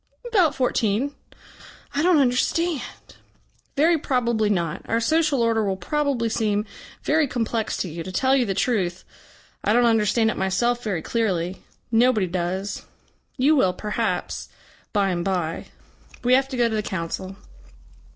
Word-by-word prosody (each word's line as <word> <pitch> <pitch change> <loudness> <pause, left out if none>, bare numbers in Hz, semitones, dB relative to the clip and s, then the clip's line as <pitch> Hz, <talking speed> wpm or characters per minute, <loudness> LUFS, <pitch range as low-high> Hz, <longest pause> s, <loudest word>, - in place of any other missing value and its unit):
"About 365 -10 +3
fourteen." 250 +1 0 0.8
"I 285 - 0
don't 350 0 +4
understand." 285 +4 +1 1.0
"Very 325 +3 +4
probably 235 -6 +1
not. 170 -3 -1
Our 230 - +2
social 300 +1 +2
order 225 -1 +2
will 195 -2 -1
probably 275 +4 0
seem 215 -2 0 0.4
very 310 -1 +2
complex 230 -3 -2
to - - -2
you. 165 0 -6
To 185 - -6
tell 260 +8 +2
you 250 -4 +2
the 195 - -1
truth, 185 -6 0 0.6
I 210 - +2
don't 240 +1 +4
understand 225 0 +3
it - - -6
myself 235 +6 0
very 190 -7 -2
clearly. 190 -6 -1 0.3
Nobody 225 -3 +4
does. 185 +2 -3 0.6
You 285 +4 +4
will, 190 -10 +3
perhaps 210 +3 -3 0.4
bye 200 -2 +2
and 175 -1 -1
bye. 175 -4 -2 0.6
We 250 +1 +3
have 265 +1 +4
to 265 -2 -5
go 240 -1 +3
to 225 - -3
the 215 - +1
Council." 190 0 -4
225 Hz, 150 wpm, -23 LUFS, 190-260 Hz, 1.0 s, don't